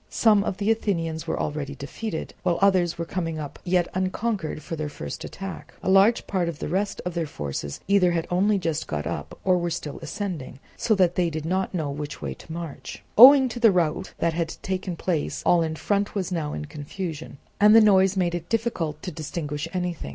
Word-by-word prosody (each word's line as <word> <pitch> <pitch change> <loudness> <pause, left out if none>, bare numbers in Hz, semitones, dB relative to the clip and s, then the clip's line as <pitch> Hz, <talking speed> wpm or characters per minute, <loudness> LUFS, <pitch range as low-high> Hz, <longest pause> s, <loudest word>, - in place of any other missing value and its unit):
Some 210 -3 +4
of 195 - -3
the 205 +2 +1
Athenians 165 -7 -1
were - - -1
already 145 -2 -3
defeated, 160 +7 -5
while 175 -2 +1
others 185 -4 +3
were 170 - -3
coming 165 -3 -3
up 150 -2 -7
yet 180 -1 +2
unconquered 185 -3 -2
for 165 - -5
their 155 -1 -3
first 75 - -7
attack. 195 -1 -8
A 190 - +1
large 195 +5 +5
part 185 -3 -1
also 170 - -3
of - - -18
the - - -3
rest 195 +4 -1
of 180 - -2
their 165 -2 -2
forces 70 - -5
either 195 -2 +4
had 165 -1 0
only 200 +4 +3
just 165 -4 -2
got 75 -1 -3
up, - - -5
or 185 -1 +3
were 175 0 -1
still 150 -3 -5
ascending, 180 -11 -5 0.2
so 220 - +1
that 180 -3 +3
they 175 -2 +1
did 155 -1 -5
not 185 +3 -1
know 155 -5 -1
which 145 +1 -6
way - - -4
to - - -13
march. 165 -3 -7
Owing 265 +3 +10
to 240 - -6
the 230 -3 +6
rout 180 0 0
that 170 - +1
had 165 0 -2
taken 185 -1 -3
place 165 -2 -2
all 175 - +5
in 160 -1 -1
front 200 +5 -1
was 190 -2 -2
now 160 -4 -2
in - - -4
confusion, 155 +1 -6 0.2
and 210 +1 +7
the - - +10
noise 195 -2 +5
made 175 -2 +1
it 175 -1 -5
difficult 200 -10 -1
to 180 - -4
distinguish 150 -1 -4
anything. 180 - -3
175 Hz, 215 wpm, -25 LUFS, 160-195 Hz, 0.2 s, Owing